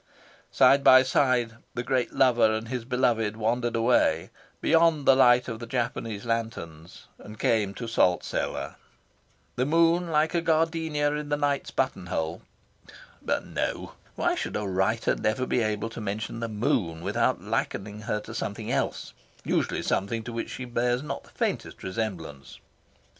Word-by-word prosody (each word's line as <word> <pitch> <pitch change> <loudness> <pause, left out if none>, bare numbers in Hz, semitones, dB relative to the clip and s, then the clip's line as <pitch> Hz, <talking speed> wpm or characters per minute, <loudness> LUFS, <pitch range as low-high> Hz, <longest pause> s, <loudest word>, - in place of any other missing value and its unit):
Side 140 0 +5
by 130 -1 +8
side, 125 -3 +1 0.2
the 120 - -2
great 130 0 0
lover 120 -4 +4
and 110 +1 -3
his 125 -2 -4
beloved 115 -4 +1
wandered 120 +2 0
away, 115 -8 +2 0.3
beyond 165 -3 +3
the 135 - +7
light 125 -2 +5
of 115 -2 -5
the 115 - -7
Japanese 115 -3 -3
lanterns, 90 -9 -4
and 105 +1 -11
came 105 -4 +1
to 120 - -5
Salt 90 -6 +2
Cellar. - - -3 0.8
The 125 +2 +1
moon, 165 +2 +3
like 155 0 +2
a 170 - +1
gardenia 160 -2 +1
in 150 0 -4
the 145 - +1
night's 145 -1 0
button - - -2
hole 80 +1 -3 0.8
but - - -1
no! - - -3 0.2
why - - +1
should - - -4
a 105 - -2
writer 95 +4 +1
never 120 +4 -1
be 125 - 0
able 110 +1 -2
to 115 - -7
mention 105 +2 -4
the 115 - -2
moon 105 -6 -1
without - - 0
likening 105 +1 -3
her 105 0 -2
to - - -10
something - - -4
else - - -2 0.3
usually - - 0
something 110 +4 -1
to 120 - -7
which 115 - -4
she 130 - -6
bears 120 +1 0
not 150 - -5
the - - -19
faintest - - -3
resemblance?... 90 -9 -5
115 Hz, 160 wpm, -27 LUFS, 105-130 Hz, 0.8 s, by